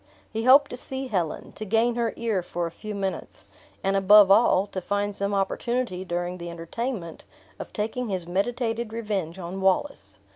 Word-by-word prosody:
He 225 +1 -3
hoped 275 +2 +7
to 245 - -4
see 265 +1 -4
Helen, 175 -7 -2
to - - -7
gain 225 +3 +2
her 230 -1 0
ear 225 -5 0
for 175 0 -3
a 165 - -4
few 215 +4 -7
minutes; 195 -1 -4 0.4
and, 195 0 +1
above 195 0 +7
all, 200 -2 +5
to 190 -2 -5
find 205 +2 -1
some 200 +1 -1
opportunity 200 0 -1
during 175 0 -3
the 170 0 -6
entertainment 170 +2 -5 0.4
of - - -7
taking 225 +3 -3
his 185 -3 -2
meditated 225 +4 -1
revenge 200 -7 -3
on 185 +1 -6
Wallace. 195 +10 0
205 Hz, 175 wpm, -26 LUFS, 185-230 Hz, 0.4 s, hoped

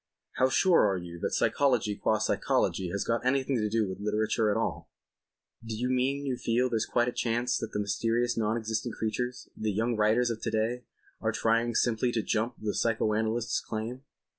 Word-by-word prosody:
How 130 - +4
sure 165 - +4
are 95 - 0
you 85 -1 -8
that - - -1
psychology 125 -7 +2
qua 110 +1 +1
psychology 95 -3 0
has 100 +3 -2
got 115 0 -1
anything 130 +1 +1
to 105 -2 0
do 110 -1 +1
with 95 +1 -6
literature 110 +1 +1
at 105 - +1
all?" 115 - -2 0.7
"Do 115 -1 -5
you 125 +3 -1
mean 135 +3 0
you 130 -2 -1
feel 120 +2 +1
there's 115 -1 0
quite 120 0 +2
a - - 0
chance 120 +1 0
that 115 - -5
the - - -2
mysterious 115 +4 0
non 110 0 0
existent 110 +1 -3
creatures—the 110 -1 -3
young 115 +4 0
writers 110 +3 +3
of 110 - -5
to - - -1
day—are 115 +2 -3
trying 115 +1 +1
simply 120 +1 +2
to 110 - 0
jump 115 +2 -1
the 105 -1 -2
psycho 110 -2 +1
analyst's 110 +2 0
claim?" 115 +4 -5
115 Hz, 190 wpm, -29 LUFS, 110-120 Hz, 0.7 s, How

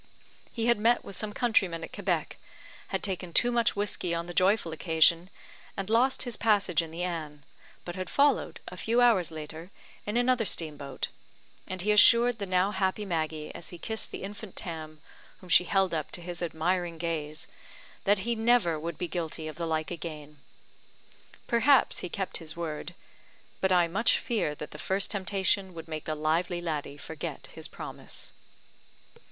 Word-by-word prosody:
He 230 -2 -2
had 235 -2 +4
met 235 +3 +3
with 200 - -7
some 215 +2 -2
countrymen 200 -8 +1
at - - -8
Quebec, - - -1 0.5
had 190 - -2
taken 185 -3 -2
too 245 - +4
much 235 -1 +2
whiskey 200 -4 -1
on 170 0 -2
the 175 - -7
joyful 185 -1 +3
occasion, 165 +2 +3 0.5
and 195 +2 -3
lost 250 +4 +3
his 245 -2 -3
passage 200 -7 +3
in 165 - -6
the 165 +2 -4
Anne, 155 -5 -4 0.4
but 175 - -5
had 185 -1 -4
followed, 285 0 +2
a - - -8
few 230 +2 +1
hours 225 -9 +5
later, 160 +2 -7 0.4
in 210 +3 0
another 245 -1 +3
steam 165 -6 -1
boat; 140 -1 -4 0.6
and 185 -1 -4
he 210 - +3
assured 235 +3 +6
the 200 - -3
now 185 +2 +2
happy 190 +1 0
Maggie, 155 -4 -2
as - - -8
he 175 - -9
kissed 220 +6 -2
the - - -7
infant 205 0 -8
Tam, 155 -3 -6 0.4
whom 185 - -14
she 180 - +6
held 195 -2 +2
up 155 -2 -2
to - - -2
his 175 0 -5
admiring 175 +1 -1
gaze, 155 -2 -3 0.6
that 200 0 +2
he 235 - +1
never 225 -8 +3
would 165 +1 -4
be 180 - -2
guilty 160 -1 -4
of 155 - -7
the 170 -1 -2
like 160 0 -1
again. 150 -3 -7 1.1
Perhaps 255 +3 +4
he 180 - -4
kept 195 +1 -3
his 160 -1 -8
word; 165 0 -4 0.6
but 190 - +1
I 175 -2 +5
much 200 +8 +3
fear 210 -11 -1
that 150 - -7
the 150 - -9
first 195 +4 0
temptation 190 -1 0
would 165 0 -8
make 155 -1 -5
the 155 - -2
lively 165 +3 0
laddie 150 -4 -3
forget 160 +1 -6
his - - -7
promise. - - -7
180 Hz, 180 wpm, -29 LUFS, 160-205 Hz, 1.1 s, assured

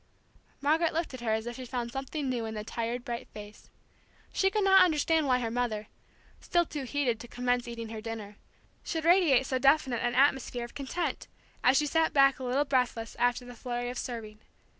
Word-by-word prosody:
Margaret 315 +3 +2
looked 330 -2 -2
at 255 - -7
her 235 - -2
as 220 +1 0
if 240 +1 -6
she 255 - -7
found 240 -1 -3
something 270 +2 -4
new 245 -3 -1
in 220 - -5
the 210 - -4
tired, 235 +2 -4
bright 235 0 -5
face. 210 0 -11 0.6
She 385 - +3
could 420 +1 0
not 385 -1 +7
understand 320 -2 +2
why 255 -1 +4
her 235 -2 -2
mother 225 -3 -2 0.5
still 345 -1 +1
too 295 -4 -5
heated 255 -4 0
to 240 - -9
commence 245 0 -1
eating 230 -1 -6
her 220 -1 -6
dinner 215 -2 -7 0.5
should 320 -2 -3
radiate 335 -7 +5
so 260 -1 -1
definite 270 -3 +3
an 240 0 0
atmosphere 265 -3 +2
of 240 - -13
content, 285 +5 -3 0.4
as 255 +2 +5
she 300 - +3
sat 320 +2 +1
back 275 -1 +5
a - - -6
little 260 +4 +1
breathless, 250 -4 -1
after 245 +1 +1
the 245 - -9
flurry 245 0 -4
of 250 - -7
serving. 220 -4 -6
250 Hz, 205 wpm, -29 LUFS, 235-290 Hz, 0.6 s, not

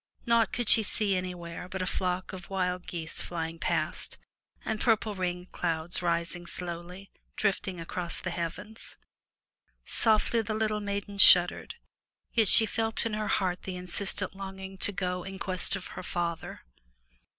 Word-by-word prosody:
Naught 230 -2 +3
could 240 -3 -3
she 225 - +8
see 205 -1 +2
anywhere 180 -1 -5
save 190 - -4
a 185 - -1
flock 185 0 -2
of 180 -2 -9
wild 180 -2 -2
geese 170 -3 -4
fiying 165 -1 -5
past, 155 -2 -2 0.5
and 220 -1 -2
purple 220 -2 +2
rain 180 -2 -3
clouds 170 -1 -2
rising 170 0 -1
slowly, 180 +3 -7 0.2
drifting 190 -3 -1
across 170 +1 -4
the 185 - -4
heavens. 185 +6 -6 0.9
Softly 225 +1 +2
the 215 0 -3
little 215 -1 0
maiden 200 0 -4
shuddered, 180 - +7 0.6
yet 225 -3 +4
she 220 - +8
felt 225 +1 0
in 225 - -2
her 215 0 -2
heart 185 -2 0
the 185 - -6
insistent 185 +1 0
longing 190 0 -8
to 205 - +2
go 180 -1 -2
in 195 0 -7
quest 185 0 0
of 185 - -7
her - - -6
father. 170 -2 -4
185 Hz, 150 wpm, -29 LUFS, 175-205 Hz, 0.9 s, she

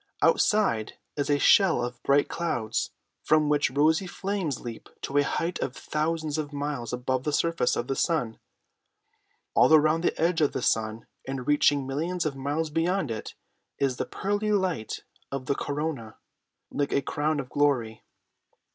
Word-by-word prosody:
Outside 155 - +3 0.2
is 145 -1 -2
a 145 - +4
shell 190 - +5
of 120 0 -7
bright 140 +1 +3
clouds, 120 -10 -2 0.3
from 155 -1 +3
which 145 -2 +3
rosy 155 +7 +2
flames 190 -7 -2
leap 115 -2 -8
to 140 +1 +1
a - - +4
height 165 +5 -2
of 130 - -3
thousands 155 0 -2
of 150 -1 -4
miles 145 -4 -3
above 125 +1 -1
the 150 - -1
surface 165 -3 +1
of 120 - -2
the 135 +1 -2
sun. 130 -11 0 1.1
All - - +5
around 155 +1 +5
the - - 0
edge 165 0 +2
of 150 - +2
the 125 - -3
sun, 110 0 0 0.2
and 135 -2 -4
reaching 145 -1 +3
millions 165 +7 -2
of 145 -3 -1
miles 145 +4 -2
beyond 165 -2 0
it, 110 - -6 0.4
is 135 -2 0
the - - -2
pearly 205 +2 -1
light 185 - -1 0.3
of 135 -2 -4
the 140 - +1
corona 145 -7 -4 0.5
like 145 0 -1
a 140 - +2
crown 150 +2 -1
of 130 -2 -5
glory. 125 -7 +1
145 Hz, 165 wpm, -27 LUFS, 130-160 Hz, 1.1 s, shell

